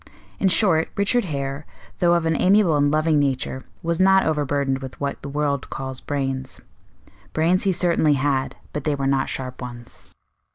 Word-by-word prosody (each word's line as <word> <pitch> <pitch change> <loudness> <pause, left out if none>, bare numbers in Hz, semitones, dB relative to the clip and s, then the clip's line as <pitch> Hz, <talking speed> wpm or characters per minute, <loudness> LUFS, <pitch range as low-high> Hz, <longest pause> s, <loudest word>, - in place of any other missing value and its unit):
In 195 - +2
short, 180 -5 +3
Richard 205 +3 +1
Hare, 140 -2 -4 0.4
though 175 -1 +4
of 170 -1 0
an 160 0 +1
amiable 185 -1 +4
and 145 0 +3
loving 155 0 +2
nature, 130 -1 -1 0.2
was 170 0 -1
not 190 0 +5
over 155 -2 +1
burdened 135 -1 0
with 130 -1 -9
what 140 -1 -3
the 140 - -7
world 140 -1 -1
calls 130 -1 -6
brains. 135 -2 -3 0.7
Brains 175 +5 +2
he 195 - +3
certainly 170 -4 +2
had, 135 -1 0 0.2
but 150 - -3
they 150 -1 0
were 135 -1 -3
not 135 -1 +1
sharp 130 -1 -5
ones. 120 -1 -9
145 Hz, 175 wpm, -22 LUFS, 135-170 Hz, 0.7 s, not